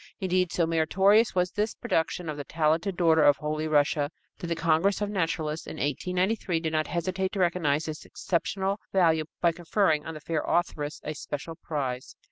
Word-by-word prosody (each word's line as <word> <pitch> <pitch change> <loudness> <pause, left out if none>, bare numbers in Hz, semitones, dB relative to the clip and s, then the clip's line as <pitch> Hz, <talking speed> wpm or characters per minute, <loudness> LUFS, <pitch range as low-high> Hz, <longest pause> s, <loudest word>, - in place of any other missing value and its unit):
Indeed, 185 -2 +1
so 170 - +1
meritorious 190 +8 +3
was 180 0 +1
this 210 +2 -1
production 180 -6 -1
of 155 - -3
the 145 - -5
talented 165 +5 0
daughter 160 -3 +4
of 145 -2 +5
Holy 155 +1 -2
Russia 145 -1 +2 0.3
that 175 - -5
the 170 - -1
Congress 165 +4 +2
of 205 -1 -2
Naturalists 165 -4 -2
in - - -6
1893 180 - -1
did 160 -1 -3
not 155 -1 +1
hesitate 185 +2 -2
to 200 - -3
recognize 160 -4 +1
its 155 -1 -5
exceptional 195 +3 -2
value 165 -4 +3 0.2
by 170 - +4
conferring 165 -2 0
on 160 - -5
the - - -7
fair 155 0 -2
authoress 150 -4 -1
a 155 - -3
special 145 +2 -6
prize. 130 -6 -4
165 Hz, 180 wpm, -27 LUFS, 155-185 Hz, 0.3 s, of